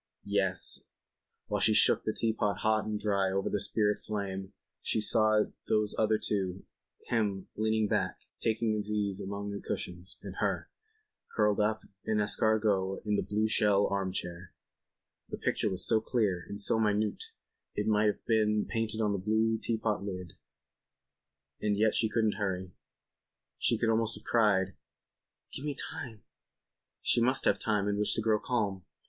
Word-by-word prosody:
Yes, 95 -3 +1 0.7
while 105 -1 -2
she 110 +1 +4
shook - - +5
the 110 - +1
teapot 110 -3 0
hot 110 0 +2
and 105 -1 -2
dry 100 -2 +1
over 95 0 -1
the 105 - 0
spirit 105 +1 +1
flame 95 -2 -4 0.3
she - - 0
saw 110 0 +4 0.2
those 105 -1 +2
other 110 0 +2
two, 95 -3 -2 0.4
him, 100 -5 0
leaning 110 0 +1
back, - - -1 0.2
taking 110 0 +1
his 105 -1 -2
ease 100 -2 -1
among 100 +1 -4
the 100 - -5
cushions, 90 +1 -4
and - - -8
her, - - -1 0.6
curled 105 -1 +2
up 110 +1 +1 0.2
en 110 - +1
escargot 105 -2 +1
in 105 -1 +1
the - - +1
blue 105 +1 0
shell 105 -2 +4
arm 95 -1 0
chair. 90 -1 -5 0.7
The - - -4
picture - - 0
was 95 - -1
so 110 -1 +3
clear 105 -7 0
and 100 - -5
so 110 +2 +4
minute 105 -1 +1 0.5
it 105 - -1
might 105 0 +3
have 105 - -2
been 105 -2 +2
painted 115 -1 -2
on 105 -1 +2
the 100 - -1
blue 110 +3 +1
teapot 110 -3 -1
lid. 90 -3 -6 1.3
And 105 -1 +1
yet 110 +1 +3
she 110 - +1
couldn't 110 -3 +1
hurry. 95 -3 -2 0.9
She 115 - +2
could 115 0 +2
almost 115 0 +1
have - - -12
cried: 100 -5 +2 0.8
"Give 135 - -5
me 150 -2 -2
time." 130 -8 -5 0.8
She 120 - +3
must 130 +3 +2
have 100 - +3
time 105 -2 0
in 100 0 0
which 105 - +1
to - - 0
grow 110 -1 +3
calm. 105 -6 -1
105 Hz, 165 wpm, -31 LUFS, 100-110 Hz, 1.3 s, shook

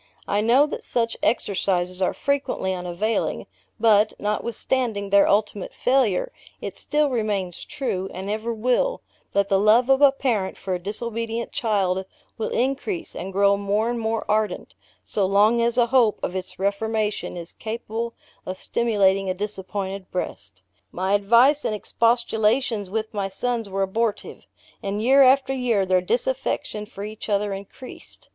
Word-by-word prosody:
I 205 - +1
know 245 +6 +5
that 300 - -6
such 230 -1 -1
exercises 185 -4 0
are 185 - +2
frequently 280 -9 -1
unavailing; 180 +5 -2 0.3
but, 215 -1 +4
notwithstanding 215 0 -2
their 200 0 +6
ultimate 205 -1 0
failure, 250 -8 +1 0.3
it - - -6
still 295 -1 0
remains 205 -7 -2
true, 195 -9 -3
and 190 +2 -6
ever 215 +3 -2
will, 250 - 0 0.3
that 200 0 +2
the 195 -1 +3
love 225 +5 +4
of 270 +1 +4
a 285 -1 +8
parent 235 -8 -1
for 190 - -4
a 180 - -1
disobedient 230 +4 -4
child, 195 -7 0 0.3
will 220 - -3
increase, 275 - -2
and 190 +2 -5
grow 200 +1 +4
more 205 +3 0
and 240 - -3
more 225 0 -1
ardent, 215 0 -1 0.3
so 200 -3 0
long 210 +4 +4
as 235 +1 +1
a 240 - +5
hope 240 -4 +3
of 180 - -2
its 185 -1 -5
reformation 210 0 -1
is 170 0 -8
capable 230 +1 -5 0.3
of 185 0 -5
stimulating 195 -5 +1
a 185 - -1
disappointed 195 -1 -5
breast. 95 - -6 0.3
My 190 +2 -1
advice 235 +8 +4
and 215 - -1
expostulations 230 -1 +1
with 220 +2 -3
my 200 -2 -2
sons 230 +2 -2
were 195 0 0
abortive; 215 +3 -2 0.3
and 200 +1 -3
year 265 +5 +5
after 270 0 +5
year 240 -7 +1
their 185 -1 +3
disaffection 235 0 -2
for 200 -2 -8
each 215 +1 -7
other 205 0 +1
increased. 200 +6 -11
215 Hz, 150 wpm, -23 LUFS, 195-235 Hz, 0.3 s, a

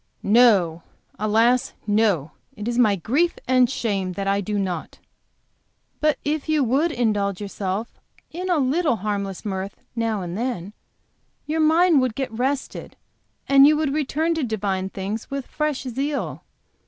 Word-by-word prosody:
"No, 200 -7 +4 0.4
alas, 225 +4 +2
no. 205 -8 +1 0.2
It 210 +1 -6
is 240 +1 0
my 215 -5 +4
grief 280 - +1
and 255 -1 +4
shame 200 -8 -2
that 195 +1 -4
I 200 +1 +2
do 205 +2 -2
not." 185 -5 -3 1.0
"But 305 -1 +2
if 300 +1 -2
you 305 -2 +3
would 275 +8 +2
indulge 205 -7 0
yourself 200 +1 -3 0.4
in 365 +3 -4
a 350 - +3
little 295 +1 +2
harmless 200 -1 -4
mirth 195 -1 -4 0.2
now 225 -4 -1
and 175 0 -5
then, 210 -4 -3 0.7
your 315 +1 -2
mind 320 -1 +5
would 255 -4 -1
get 270 -3 -3
rested 265 +4 -3 0.5
and 275 0 +7
you 305 0 +4
would 300 -3 0
return 310 +3 0
to 320 -3 -2
divine 195 -5 -2
things 200 +4 -5
with 275 -2 -4
fresh 300 -3 -2
zeal. 275 +3 -3
230 Hz, 150 wpm, -23 LUFS, 200-280 Hz, 1.0 s, and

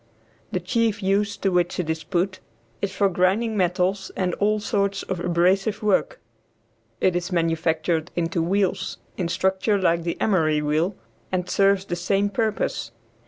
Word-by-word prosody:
The 185 - 0
chief 220 +2 0
use 200 +2 +1
to 195 - 0
which 175 0 +1
it 175 - -1
is 160 0 -2
put 185 +1 -1 0.4
is 200 - -1
for 200 +1 +2
grinding 195 +5 +1
metals 185 +1 0
and 180 -2 0
all 210 +1 +2
sorts 200 -2 -1
of 190 -2 -4
abrasive 185 +5 +1
work. 210 - +1 0.8
It 185 - +2
is 175 +2 -2
manufactured 165 -1 0
into 170 0 0
wheels, 190 +2 0 0.2
in 180 - -2
structure 190 +4 +1
like 170 -2 +2
the 170 0 -3
emery 160 -7 +2
wheel, 155 +6 0 0.4
and 180 -1 -1
serves 195 -1 +3
the 175 - -3
same 195 +3 0
purpose. 215 - -1
185 Hz, 155 wpm, -24 LUFS, 170-200 Hz, 0.8 s, serves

